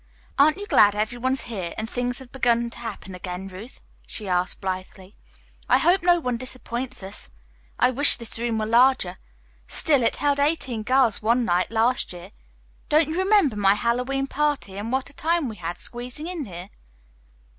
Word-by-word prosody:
"Aren't 305 +4 +5
you 405 - -6
glad 205 - +5
every 215 +3 -2
one's 260 +2 0
here, 190 -8 -5
and 220 - -3
things 245 +1 -2
have 260 -2 -11
begun 235 -2 +1
to - - -10
happen 215 -5 -7
again, 180 +1 -6
Ruth?" 195 +7 -11 0.3
she 210 - -6
asked 180 0 -1
blithely. 185 0 -6 0.6
"I - - +6
hope 370 +3 +3
no 350 0 +4
one 250 -6 -2
disappoints 255 -1 -4
us. 195 +2 -6 0.5
I - - +3
wish 285 +3 +7
this 230 -1 -3
room 235 -1 -1
were 215 - -1
larger. 230 -5 +3 0.5
Still, 285 -4 +2
it 230 - +1
held 285 -1 0
eighteen 280 -6 0
girls 255 0 +2
one 235 +3 +2
night 180 -1 +1
last 230 -1 +1
year. 175 +2 -11 0.6
Don't 305 0 +3
you 320 - -3
remember 380 - +3
my 200 -1 +3
Hallowe'en 250 +5 -1
party, 290 -8 -1
and 210 +4 -5
what 265 +1 -1
a - - -16
time 330 0 0
we 220 -3 -7
had 175 0 -5
squeezing 245 +5 -6
in 340 -4 -4
here?" 180 -1 -9
240 Hz, 180 wpm, -24 LUFS, 205-270 Hz, 0.6 s, wish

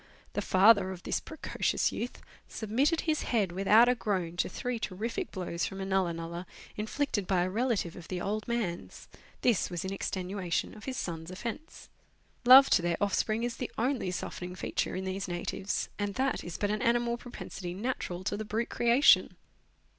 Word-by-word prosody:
The - - -1
father 195 0 +5
of 185 -2 -7
this - - -1
pre 315 - -11
cocious - - 0
youth 245 - -5 0.2
submitted 260 +10 +1
his 315 -2 0
head 210 -7 +1
without 200 +6 +5
a 250 - +5
groan 190 -8 -2
to - - +1
three 245 -2 -3
terrific 225 - -3
blows 175 -2 -3
from 195 - -7
a 190 - -3
nulla 190 -2 +1
nulla, 170 +2 -6 0.3
inflicted 215 -2 -1
by 180 -2 +2
a 185 - -1
relative 220 -6 0
of 175 - -10
the 185 - -3
old 210 +4 -2
man's. 225 -8 -3 0.3
This 235 -6 +2
was 175 0 -4
in 190 - -3
extenuation 185 -2 -2
of 215 - -11
his 260 -2 -4
son's 165 -1 -4
offence. 230 +10 -7 0.6
Love 265 +2 +10
to - - +5
their 170 -1 0
offspring 215 +2 +1
is 240 -1 -2
the 250 - -4
only 245 -4 0
softening 180 0 -5
feature - - -2
in 190 +1 -3
these 190 +1 -3
savages, 175 +2 -3
and 205 -1 -2
that 265 0 0
is 175 - -6
but 205 0 0
an 210 - -1
animal 235 0 +2
propensity 195 -7 -7
natural 190 -5 -3
to - - -1
the 215 - -4
brute 220 +2 -2
creation. 240 +4 +5
205 Hz, 185 wpm, -30 LUFS, 180-235 Hz, 0.6 s, Love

